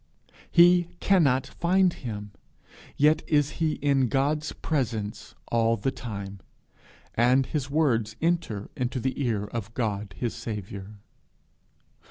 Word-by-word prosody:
He 175 0 +6
cannot 140 -9 +3
find 180 +5 +2
him! 105 -4 -6 0.7
Yet 150 +2 +4
is 145 -2 +3
he 155 -2 +2
in 135 -3 +1
his 150 +4 0
presence 115 -9 -3
all 115 0 +2
the 135 +7 -1
time, 100 -6 -7 0.7
and 125 +3 +3
his 145 -1 -3
words 120 -8 +1
enter 165 -12 -1
into 130 +1 -2
the 130 +3 -2
ear 110 -5 0
of 110 +1 -5
God 105 -4 -2
his 120 -3 -2
Saviour. 105 -3 -6
125 Hz, 120 wpm, -27 LUFS, 110-150 Hz, 0.7 s, He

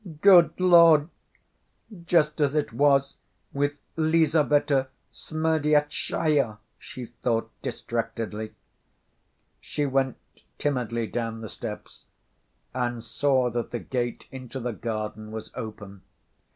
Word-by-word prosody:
"Good 185 -4 +6
Lord! 170 -4 +6 1.0
Just 150 -3 +2
as 145 0 +2
it 150 - 0
was 140 -1 +3 0.4
with 145 +1 0 0.2
Lizaveta 155 -4 +2 0.3
Smerdyastchaya!" 150 -5 0 0.2
she 125 - -8
thought 115 -1 -2
distractedly. 115 -2 -4 1.0
She 145 - -3
went 135 -2 0 0.4
timidly 120 -5 -1
down 115 0 -4
the 110 - -7
steps - - -8 0.7
and 120 -2 -2
saw 130 0 +1
that 120 0 -3
the 120 - -3
gate 120 0 -4
into 130 0 -7
the 120 -1 -3
garden 110 -1 -5
was 110 0 -7
open. 100 -3 -8
130 Hz, 100 wpm, -26 LUFS, 115-150 Hz, 1.0 s, Good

